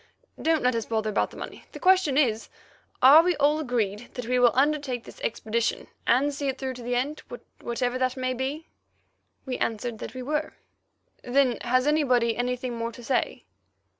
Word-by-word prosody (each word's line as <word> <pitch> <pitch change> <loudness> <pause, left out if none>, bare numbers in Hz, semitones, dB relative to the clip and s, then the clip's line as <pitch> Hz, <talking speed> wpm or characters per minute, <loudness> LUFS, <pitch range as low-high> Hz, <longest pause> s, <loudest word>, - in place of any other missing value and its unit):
So - - -13
don't 320 -2 +2
let 250 0 +3
us 230 -1 -2
bother 220 -1 -1
about 205 - +1
the - - -13
money. - - -8
The - - -8
question 370 -7 +3
is—Are 260 +3 +3
we 355 +1 +1
all 295 +2 +2
agreed 240 -5 -2
that 250 - -5
we 250 +1 +1
will 245 -1 +6
undertake 275 -3 +1
this - - -13
expedition 230 +1 -1 0.2
and 280 +4 +3
see 280 0 -3
it 265 0 -1
through 260 -1 -3
to 250 - -10
the 245 +1 -2
end, 280 +5 -2 0.4
whatever 245 +1 -2
that 255 0 0
may 255 0 -1
be?" 270 +5 -4 0.8
We 255 -2 -4
answered 225 0 -2
that - - -7
we 255 - -5
were. 300 +3 -2 0.7
"Then 255 -1 +2
has 255 +1 +2
anybody 255 -7 +2
anything 250 0 -2
more 230 0 -3
to 240 +1 -12
say?" 260 +2 -1
255 Hz, 185 wpm, -26 LUFS, 240-285 Hz, 0.8 s, will